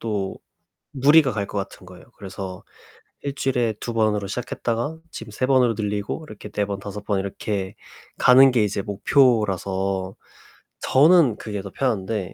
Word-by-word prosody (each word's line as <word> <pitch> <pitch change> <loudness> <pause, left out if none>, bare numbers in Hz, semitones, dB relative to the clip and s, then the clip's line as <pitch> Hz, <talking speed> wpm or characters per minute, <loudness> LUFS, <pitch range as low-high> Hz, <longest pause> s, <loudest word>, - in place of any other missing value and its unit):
또 105 -4 -3 0.5
무리가 145 +2 +5
갈 105 -1 -2
것 100 - -4
같은 95 -1 -7
거예요. 90 0 -14
그래서 95 -1 -7 0.6
1 140 -1 -4
주일에 125 -5 0
2 120 - -5
번으로 105 -3 +1
시작했다가 120 +5 -3
지금 115 -1 -8
3 130 +5 -1
번으로 130 -3 +3
늘리고 105 +8 -3
이렇게 105 -2 -10
4 105 0 -1
번, 100 -1 -4
5 100 +1 -8
번 100 -2 0
이렇게 100 0 -4 0.4
가는 130 +2 +7
게 120 -3 +2
이제 100 -1 -1
목표라서 95 - +1 0.6
저는 145 - +4
그게 105 -2 -5
더 100 - -8
편한데. 105 -6 -2
105 Hz, 280 characters per minute, -23 LUFS, 100-125 Hz, 0.6 s, 가는